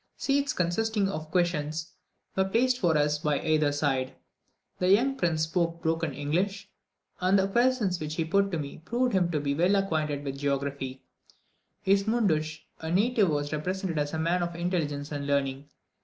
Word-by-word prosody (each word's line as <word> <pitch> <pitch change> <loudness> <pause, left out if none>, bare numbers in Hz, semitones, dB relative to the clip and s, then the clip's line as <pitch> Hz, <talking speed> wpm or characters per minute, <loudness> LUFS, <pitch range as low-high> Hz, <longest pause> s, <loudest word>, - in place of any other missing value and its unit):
Seats, 280 +1 +1
consisting 205 - 0
of 155 -5 -5
cushions, 160 -2 -1 0.4
were 190 - +2
placed 245 +6 +2
for 170 -7 +3
us 150 0 +2
by 150 -1 +1
their 155 -2 +2
side. 135 -3 -1 0.6
The 180 - +2
young 240 +8 +4
prince 170 -8 +1
spoke 165 +1 -1
broken 165 -1 0
English, 185 +9 -1 0.5
and 185 +2 +3
the 195 0 +2
questions 235 -4 +2
which 155 -1 -4
he 165 - 0
put 200 +4 +2
to 175 - -2
me 145 0 -6
proved 245 +6 0
him 180 -3 +2
to 155 -3 0
be 140 -1 -1
well 180 +7 +3
acquainted 155 -7 0
with 135 -1 -5
geography. 140 -2 -2 0.8
His 195 +1 +3
mundsch, 155 -9 +1 0.2
{212a} 160 - -5
a - - -2
native, 210 +1 +3
was 145 0 -1
represented 180 +1 -2
as 145 0 -1
a 160 - -3
man 170 +3 +1
of 170 -1 -2
intelligence 155 -5 -2
and 145 -1 -4
learning. 140 0 -1
165 Hz, 175 wpm, -28 LUFS, 150-195 Hz, 0.8 s, young